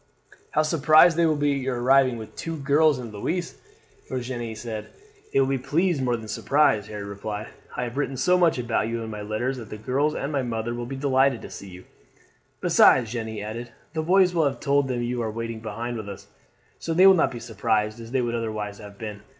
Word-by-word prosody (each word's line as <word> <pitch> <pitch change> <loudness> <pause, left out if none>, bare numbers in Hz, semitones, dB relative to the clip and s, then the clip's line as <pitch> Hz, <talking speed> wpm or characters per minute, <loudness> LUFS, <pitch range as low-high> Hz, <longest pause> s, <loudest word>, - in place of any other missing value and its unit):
"How 155 - +2
surprised 155 +2 +5
they 170 0 +3
will 155 - +2
be 145 -1 +1
at 140 - -2
your 130 -2 -2
arriving 130 0 +4
with 110 -1 -10
two 165 -1 -4
girls 145 +1 +3
and 120 -4 -7
Louise!" 170 - -3 0.5
Virginie 120 -3 -4
said. 110 -1 -6 0.4
"They - - +2
will 135 - +4
be 135 -1 0
pleased 165 +3 +1
more 125 -2 +1
than 110 -1 -9
surprised," 110 -2 +2
Harry 105 -1 -6
replied. 105 +2 -6 0.3
"I 125 - -1
have 120 +2 -5
written 135 -2 -1
so 180 +8 +3
much 175 -5 +3
about 120 -3 0
you 115 0 -3
in 110 - -6
my 105 -1 -6
letters 110 +6 -2
that 115 -3 -9
the 105 - -7
girls 135 +7 0
and 140 - -3
my 140 -2 0
mother 120 -1 -3
will 120 0 -5
be 135 - -5
delighted 135 -2 +2
to - - -9
see 100 - -9
you." 90 0 -11 0.8
"Besides," 115 -4 +5
Jeanne 115 -2 -3
added, 115 +3 -6 0.2
"the 160 - -1
boys 180 +2 +4
will 165 -3 +2
have 140 -1 -1
told 140 -1 +2
them 125 -2 -2
you 120 0 -2
are 115 - -2
waiting 115 +1 -5
behind 115 +2 -5
with 105 -2 -6
us, 100 - -9 0.5
so 165 - -3
they 185 +3 +6
will 195 - +9
not 175 - +3
be 120 - -7
so 115 0 -10
surprised 105 +2 0
as 115 0 -9
they 130 +1 0
would 120 -1 -2
otherwise 110 -3 -3
have 105 -1 -11
been. 105 -2 -7
120 Hz, 230 wpm, -25 LUFS, 110-140 Hz, 0.8 s, will